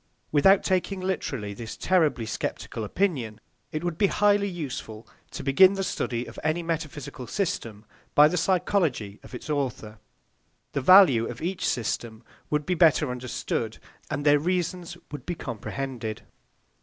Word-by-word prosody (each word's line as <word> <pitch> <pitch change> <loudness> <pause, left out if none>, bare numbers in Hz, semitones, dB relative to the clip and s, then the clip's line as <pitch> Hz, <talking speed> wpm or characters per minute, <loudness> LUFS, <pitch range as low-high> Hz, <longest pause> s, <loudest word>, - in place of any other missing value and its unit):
Without 190 +7 +5
taking 190 +1 0
literally 145 - -3
this 115 +2 -7
terribly 160 -10 +2
sceptical 110 0 -4
opinion, 120 - -1 0.3
it 155 +2 -3
would 175 -2 -3
be 200 - +5
highly 205 0 +3
useful 125 - -6 0.2
to - - -7
begin 185 +8 +6
the 195 -1 -2
study 120 -9 -2
of - - -10
any 165 +2 0
metaphysical 150 -5 -5
system 115 - -3 0.3
by 150 +1 +8
the 180 - -1
psychology 170 - 0
of - - -11
its 125 - -8
author. 125 -8 -3 0.7
The 140 - -1
value 140 - +7
of 120 - -7
each 180 +2 -3
system 115 -1 -2 0.3
would 150 -1 0
be 180 - 0
better 155 -5 +4
understood, 120 -2 -3 0.3
and 145 -1 -3
their 145 0 +6
reasons 175 +1 -2
would 145 -4 -7
be 175 - -2
comprehended. 120 -3 -5
150 Hz, 145 wpm, -26 LUFS, 120-180 Hz, 0.7 s, by